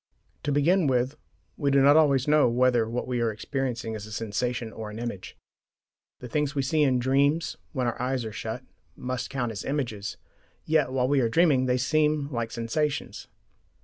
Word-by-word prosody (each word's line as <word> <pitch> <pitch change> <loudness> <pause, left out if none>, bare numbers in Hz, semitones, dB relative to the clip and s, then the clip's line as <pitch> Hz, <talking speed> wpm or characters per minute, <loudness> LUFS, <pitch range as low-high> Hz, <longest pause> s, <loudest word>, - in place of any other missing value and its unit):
To 145 - -2
begin 160 +4 +3
with: 130 +2 +1 0.4
we 145 - +1
do 140 0 +4
not 140 +2 +6
always 140 -4 +4
know 150 -4 +5
whether 120 -2 +2
what 120 +2 -2
we 125 -1 -1
are 115 -1 +1
experiencing 120 0 -3
is 105 -1 -6
a - - -11
sensation 115 +2 -3
or 110 -1 -6
an 105 - -8
image. 115 -5 -6 0.8
The 125 - -6
things 145 +3 -1
we 140 - +1
see 155 +4 +1
in 135 -3 +3
dreams 140 +6 +1 0.2
when 130 -4 -1
our 120 0 -2
eyes 125 -1 -1
are 110 - -5
shut 115 +3 -5 0.3
must 125 0 -4
count 125 -3 -2
as 110 -1 -6
images, 120 -8 -3 0.5
yet 155 -4 +2
while 130 -1 +1
we 140 0 +3
are 120 -3 +2
dreaming 140 -2 +3
they 125 0 +2
seem 150 +2 +1
like 115 -3 -2
sensations. 140 +6 -3
130 Hz, 185 wpm, -26 LUFS, 115-145 Hz, 0.8 s, not